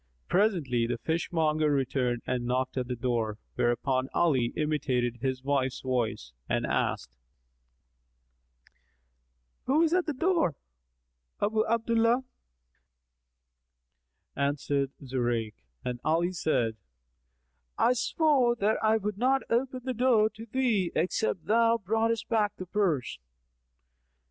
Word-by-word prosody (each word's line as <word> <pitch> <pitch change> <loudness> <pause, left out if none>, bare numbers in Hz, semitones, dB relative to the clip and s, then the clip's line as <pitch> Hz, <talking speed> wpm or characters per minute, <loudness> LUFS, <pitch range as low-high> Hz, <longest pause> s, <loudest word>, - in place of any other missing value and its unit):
Presently, 165 - +1
the 120 0 -2
fishmonger 155 +1 0
returned 130 -3 0
and 125 -1 -1
knocked 130 +1 -1
at 125 -2 -2
the 125 - -3
door, 115 -3 -1 0.2
whereupon 130 +2 0
Ali 135 -9 +2
imitated 130 -6 0
his 130 +1 -3
wife's 135 -2 0
voice 115 - -2 0.2
and - - 0
asked, - - -1 2.5
"Who 295 +5 +4
is 330 0 +2
at 365 -1 +2
the 305 - 0
door?" 325 - +1 0.8
"Abu 215 +1 +1
Abdallah," 230 +2 +2 2.1
answered 140 0 0 0.2
Zurayk 120 -4 -1 0.3
and 125 -1 -3
Ali 170 +3 +1
said, 120 -10 0 1.0
"I 245 - +4
swore 250 -1 +2
that 215 -1 +1
I 220 0 +3
would 210 -1 -4
not 265 +2 +2
open 255 +2 0
the 260 0 -2
door 230 -3 +3
to 225 +1 -11
thee, 220 -7 +1
except 180 +2 0
thou 230 +2 +3
broughtest 225 +2 0
back 215 -3 +1
the 185 - -7
purse." 175 - -1
165 Hz, 115 wpm, -28 LUFS, -, 2.5 s, Who